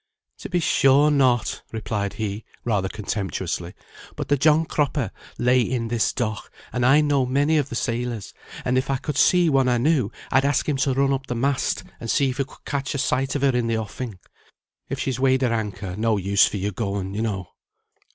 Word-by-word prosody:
"To - - -7
be 180 - +1
sure 145 -1 +4
not," 130 -5 +2
replied 105 -2 -3
he, 105 0 -4 0.2
rather 100 -5 0
contemptuously. 105 -4 -4 0.4
"But - - -5
the 145 - +5
John 155 +3 +4
Cropper 145 -8 -1 0.3
lay 125 +1 +3
in 115 -1 -1
this 115 -1 +1
dock, 110 -4 -3 0.2
and 125 - 0
I 135 +5 +6
know 145 -3 +2
many 145 +4 +2
of 140 -1 -2
the 120 - -5
sailors; 120 -3 -3 0.3
and 125 +1 +2
if 130 - -4
I 135 - +1
could 150 +2 -4
see 180 +4 +4
one 135 -4 +3
I 120 - +3
knew, 130 -4 +2 0.2
I'd 130 +2 +4
ask 140 -1 +1
him 145 -3 +1
to 135 -1 +1
run 135 0 +2
up 135 0 -3
the 125 - -3
mast, 135 +3 0 0.2
and 115 - -6
see 135 +2 +2
if 130 - -8
he 140 - +1
could - - -19
catch 140 0 -2
a - - 0
sight 135 0 0
of 140 - -1
her 135 -2 +3
in 120 -1 +1
the 115 -1 0
offing. 110 0 -5 0.7
If 135 - -3
she's 130 -2 -2
weighed 130 0 +3
her 120 -2 +2
anchor 100 -4 -3
no 110 +1 +1
use 100 +1 +4
for - - -4
your 100 +2 -2
going, 100 -1 -3
you 105 - -2
know." 100 -6 -3
125 Hz, 210 wpm, -23 LUFS, 110-140 Hz, 0.7 s, I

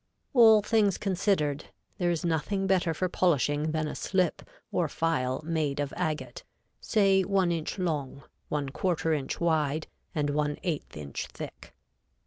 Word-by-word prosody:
All 220 -4 +7
things 210 -4 +2
considered, 180 -7 0 0.3
there 175 -1 +2
is 170 0 -1
nothing 175 +4 0
better 185 -3 +2
for 185 +3 -1
polishing 150 -4 +1
than 155 -1 -1
a - - -4
slip 185 -3 0 0.3
or 175 -3 +1
file 150 -4 -1
made 155 -4 -1
of 145 -1 -2
agate, 135 -6 -3 0.4
say 195 - +3
one 190 -2 +2
inch 165 +1 -3
long, 150 -7 -2 0.3
one 145 -2 -1
quarter 165 +1 0
inch 145 -3 -2
wide 155 -2 +1 0.3
and 145 -2 +1
one 150 0 0
eighth 160 - -3
inch 70 -2 -5
thick. - - -10
160 Hz, 145 wpm, -28 LUFS, 145-185 Hz, 0.4 s, All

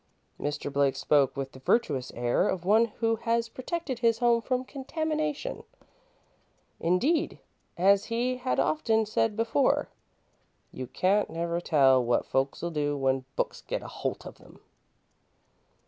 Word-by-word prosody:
Mr. 145 -1 -3
Blake 140 -1 +2
spoke 140 -3 +2
with 135 -1 -4
the 130 - -13
virtuous 135 - 0
air 120 - +1
of 175 -2 -3
one 220 +4 +5
who 225 0 -1
has 230 0 0
protected 260 +2 -4
his 230 -1 +3
home 235 -1 +3
from 255 +2 -1
contamination. 310 - -3 1.2
Indeed, 260 - +1 0.4
as 195 +3 +4
he 245 +2 -1
had 255 0 -1
often 225 -8 +2
said 215 0 0
before, 230 +5 +1 0.8
"you 130 - -6
can't 195 +8 +1
never 170 +1 -2
tell 135 -6 +4
what 120 0 +1
folks'll 135 +6 -1
do 145 -2 -1
when 135 -1 0
books - - -2
gets - - -4
a - - -7
holt - - -4
of - - -11
'em." - - -17
210 Hz, 140 wpm, -28 LUFS, 145-245 Hz, 1.2 s, one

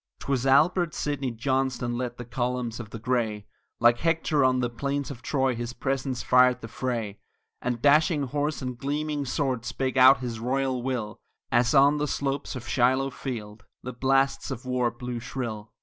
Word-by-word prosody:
'Twas 135 -1 -1
Albert 165 +5 +3
Sidney 140 -3 -2
Johnston 125 0 -1
led 120 0 -4
the 120 - -7
columns 120 -1 -2
of 115 -4 -7
the 115 - -7
Gray, 110 -3 -1 0.3
Like 120 0 +5
Hector 160 -3 +1
on 130 -1 +3
the 125 - +1
plains 140 +4 -3
of 120 -4 -9
Troy 135 0 0
his 120 0 -5
presence 135 -1 -2
fired 125 0 +4
the 115 - -7
fray; 115 -4 -3 0.4
And 120 -1 -3
dashing 150 +1 +4
horse 145 +2 -2
and 125 -1 -5
gleaming 145 +1 -2
sword 130 -2 -1
spake 130 +1 -2
out 130 +1 +8
his 120 -3 -5
royal 130 +1 -1
will 120 -5 -3 0.3
As 120 +2 +3
on 140 +2 +5
the 150 - 0
slopes 140 0 -2
of 120 -1 -7
Shiloh 130 +2 +2
field 115 -5 -7 0.2
the 125 - -5
blasts 135 +2 +1
of 120 - -6
war 125 -1 +1
blew 120 +1 -6
shrill. 115 -3 -5
130 Hz, 175 wpm, -26 LUFS, 120-135 Hz, 0.4 s, out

